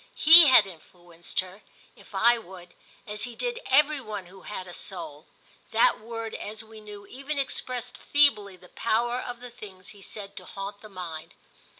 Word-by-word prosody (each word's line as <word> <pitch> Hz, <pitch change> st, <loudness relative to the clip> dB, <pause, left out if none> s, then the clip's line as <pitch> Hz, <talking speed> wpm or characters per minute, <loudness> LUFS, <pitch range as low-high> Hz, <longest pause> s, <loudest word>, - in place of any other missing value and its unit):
He 325 Hz, 0 st, +9 dB
had 255 Hz, -6 st, +7 dB
influenced 175 Hz, -1 st, -6 dB
her, 185 Hz, +3 st, -13 dB, 0.3 s
if -, -, -16 dB
I 235 Hz, +1 st, +4 dB
would, 180 Hz, -4 st, -13 dB, 0.3 s
as 210 Hz, +2 st, -3 dB
he 240 Hz, -1 st, -9 dB
did 485 Hz, -1 st, -3 dB
every 300 Hz, -1 st, +3 dB
one 210 Hz, -5 st, -6 dB
who 190 Hz, +2 st, -15 dB
had 185 Hz, -2 st, -7 dB
a 175 Hz, -, -9 dB
soul: 165 Hz, -6 st, -7 dB, 0.4 s
that -, -, +3 dB
word, 225 Hz, 0 st, -6 dB
as 215 Hz, +1 st, -6 dB
we 220 Hz, 0 st, -14 dB
knew, 205 Hz, -1 st, -11 dB
even 275 Hz, +7 st, -5 dB
expressed 250 Hz, -2 st, -3 dB
feebly 210 Hz, -10 st, +3 dB
the 180 Hz, 0 st, -18 dB
power 240 Hz, +2 st, 0 dB
of 245 Hz, -1 st, -7 dB
the 250 Hz, -1 st, -9 dB
things 190 Hz, -5 st, -12 dB
he 205 Hz, -, -14 dB
said 200 Hz, 0 st, -9 dB
to -, -, -6 dB
haunt 200 Hz, +1 st, -7 dB
the 215 Hz, -, -12 dB
mind. 170 Hz, -5 st, -8 dB
210 Hz, 180 wpm, -27 LUFS, 185-245 Hz, 0.4 s, He